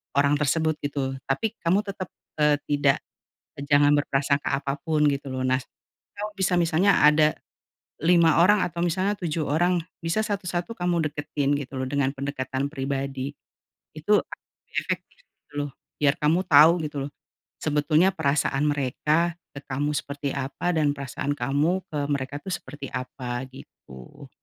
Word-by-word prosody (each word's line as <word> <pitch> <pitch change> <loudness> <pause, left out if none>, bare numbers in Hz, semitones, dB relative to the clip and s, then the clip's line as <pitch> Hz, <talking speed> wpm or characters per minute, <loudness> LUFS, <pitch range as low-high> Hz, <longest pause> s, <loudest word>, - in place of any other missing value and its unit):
orang 140 +1 +4
tersebut, 155 +2 +1
gitu. 140 -2 -2
Tapi 210 +12 -1
kamu 180 +4 +3
tetep, 190 -2 -5 0.3
eee, 150 -1 +4
tidak 145 -2 +3 0.7
jangan 145 0 +5
berprasangka 140 -1 0
apa 140 0 -2
pun 155 0 +1
gitu 140 -1 -2
loh. 130 - -3
Nah 130 0 +3 0.6
kalo 210 +1 -4
bisa 190 -2 +1
misanya 170 +4 +3
ada 150 +1 +6 0.7
5 170 -2 +5
orang 205 +3 +5
atau 170 0 -4
misalnya 185 +4 +1
7 160 -3 -2
orang, 175 +4 +2 0.2
bisa 165 +6 +1
satu-satu 185 -1 -3
kamu 175 -3 0
deketin 145 -1 -1
gitu 135 -1 -7
loh 130 - -1
dengan 140 -1 +1
pendekatan 135 0 -3
pribadi. 135 -1 -3 0.6
Itu 170 +7 +3
akan - - -11 0.3
lebih - - -32
efektif - - -4
gitu - - -34
loh. - - -8 0.3
Biar 145 -1 +4
kamu 155 +4 +3
tau 160 +3 +7
gitu 150 -1 -5
loh, - - -17 0.5
sebetulnya 155 +3 +3
perasaan 140 -3 +1
mereka, 150 +4 +1 0.2
ke 140 - -7
kamu 145 +2 -1
seperti 140 0 -3
apa, 140 +6 -2
dan 150 -2 +3
perasaan 140 +1 -3
kamu 145 +8 0
ke 150 - -4
mereka 140 0 -2
tuh - - -10
seperti 140 -4 -8
apa, 125 0 -4
gitu. 65 - -13
145 Hz, 150 wpm, -25 LUFS, 140-170 Hz, 0.7 s, tau